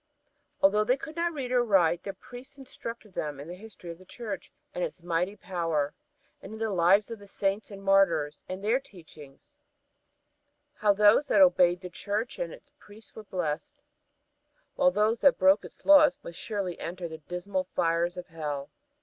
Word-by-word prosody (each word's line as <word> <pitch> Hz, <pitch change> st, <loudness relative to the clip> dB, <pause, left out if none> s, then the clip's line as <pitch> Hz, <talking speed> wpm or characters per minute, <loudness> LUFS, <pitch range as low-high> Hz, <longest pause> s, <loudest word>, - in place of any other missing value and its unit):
Although 210 Hz, +2 st, +5 dB
they 250 Hz, +5 st, +2 dB
could 310 Hz, +3 st, -9 dB
not 340 Hz, 0 st, 0 dB
read 270 Hz, -6 st, -5 dB
or 250 Hz, -1 st, +3 dB
write, 175 Hz, -6 st, +3 dB
their 195 Hz, -, -6 dB
priests 250 Hz, +7 st, -13 dB
instructed 230 Hz, -5 st, -9 dB
them 150 Hz, -4 st, -4 dB
in 145 Hz, -, -8 dB
the 175 Hz, -, -7 dB
history 185 Hz, -3 st, -10 dB
of 165 Hz, -, -11 dB
the -, -, -14 dB
Church 200 Hz, -3 st, -7 dB, 0.2 s
and 180 Hz, -, -2 dB
its 175 Hz, -, -5 dB
mighty 175 Hz, +3 st, -1 dB
power, 165 Hz, -7 st, -2 dB, 0.5 s
and 195 Hz, -, -10 dB
in -, -, -7 dB
the 220 Hz, -1 st, -2 dB
lives 195 Hz, +4 st, +3 dB
of 225 Hz, -, -6 dB
the 200 Hz, -, -14 dB
Saints 200 Hz, +1 st, -1 dB
and 195 Hz, -1 st, -10 dB
Martyrs 170 Hz, -7 st, +2 dB
and 185 Hz, +2 st, -6 dB
their 230 Hz, +5 st, +2 dB
teachings 160 Hz, -, -16 dB, 1.2 s
how 210 Hz, -6 st, +2 dB
those 210 Hz, +7 st, +5 dB
that -, -, +3 dB
obeyed 180 Hz, -10 st, +5 dB
the 180 Hz, -, -7 dB
Church 210 Hz, +6 st, -3 dB
and -, -, -3 dB
its -, -, -14 dB
priests 210 Hz, +2 st, -15 dB
were 220 Hz, -, -10 dB
blessed, 180 Hz, -, -3 dB, 1.0 s
while 270 Hz, -1 st, +4 dB
those 220 Hz, -2 st, +1 dB
that 280 Hz, -2 st, +5 dB
broke 190 Hz, +1 st, +4 dB
its -, -, -14 dB
laws 295 Hz, -2 st, +7 dB
must 170 Hz, -, -9 dB
surely 200 Hz, -5 st, -4 dB
enter 175 Hz, 0 st, -5 dB
the 160 Hz, -1 st, -9 dB
dismal 180 Hz, +4 st, -3 dB
fires 170 Hz, +2 st, +1 dB
of 180 Hz, -, -6 dB
Hell. 150 Hz, -4 st, -5 dB
195 Hz, 185 wpm, -28 LUFS, 175-225 Hz, 1.2 s, laws